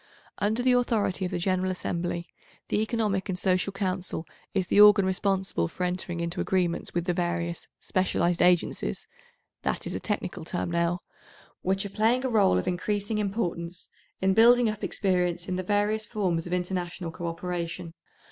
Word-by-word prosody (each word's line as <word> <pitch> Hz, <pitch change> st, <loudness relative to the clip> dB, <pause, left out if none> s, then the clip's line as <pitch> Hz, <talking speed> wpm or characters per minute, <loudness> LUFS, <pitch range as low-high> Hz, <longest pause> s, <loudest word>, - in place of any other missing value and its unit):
Under 220 Hz, +4 st, +1 dB
the 255 Hz, -, +4 dB
authority 225 Hz, -6 st, +1 dB
of -, -, -2 dB
the 180 Hz, -, -1 dB
General 185 Hz, +1 st, +1 dB
Assembly, 175 Hz, -1 st, -2 dB, 0.4 s
the 210 Hz, -, +1 dB
Economic 215 Hz, -3 st, 0 dB
and 180 Hz, -, -1 dB
Social 185 Hz, +1 st, +1 dB
Council 185 Hz, -4 st, -2 dB, 0.3 s
is 190 Hz, -2 st, 0 dB
the 205 Hz, -, +5 dB
organ 210 Hz, -1 st, +8 dB
responsible 190 Hz, -, 0 dB
for 180 Hz, -, -5 dB
entering 180 Hz, -1 st, -2 dB
into 170 Hz, +1 st, -2 dB
agreements 180 Hz, -3 st, 0 dB
with 175 Hz, -1 st, 0 dB
the 180 Hz, -, +1 dB
various 175 Hz, -1 st, -2 dB
"specialised 175 Hz, -2 st, +1 dB
agencies"—that 480 Hz, -, -1 dB
is -, -, -3 dB
a -, -, -2 dB
technical 205 Hz, -6 st, -3 dB
term 175 Hz, +1 st, -3 dB
now—which 175 Hz, +3 st, -3 dB
are -, -, -4 dB
playing 230 Hz, +6 st, +2 dB
a -, -, +1 dB
role 205 Hz, -, +4 dB
of 90 Hz, -, -2 dB
increasing 205 Hz, +4 st, -1 dB
importance 180 Hz, -4 st, -2 dB, 0.3 s
in 190 Hz, 0 st, +3 dB
building 240 Hz, +3 st, +6 dB
up 215 Hz, -, -9 dB
experience 180 Hz, -2 st, 0 dB
in 185 Hz, -, -1 dB
the 185 Hz, -, -1 dB
various 210 Hz, +3 st, 0 dB
forms 180 Hz, -7 st, -1 dB
of 175 Hz, -, -4 dB
international 180 Hz, -1 st, -2 dB
co 175 Hz, +1 st, -5 dB
operation. 170 Hz, 0 st, -4 dB
185 Hz, 160 wpm, -27 LUFS, 175-205 Hz, 0.4 s, organ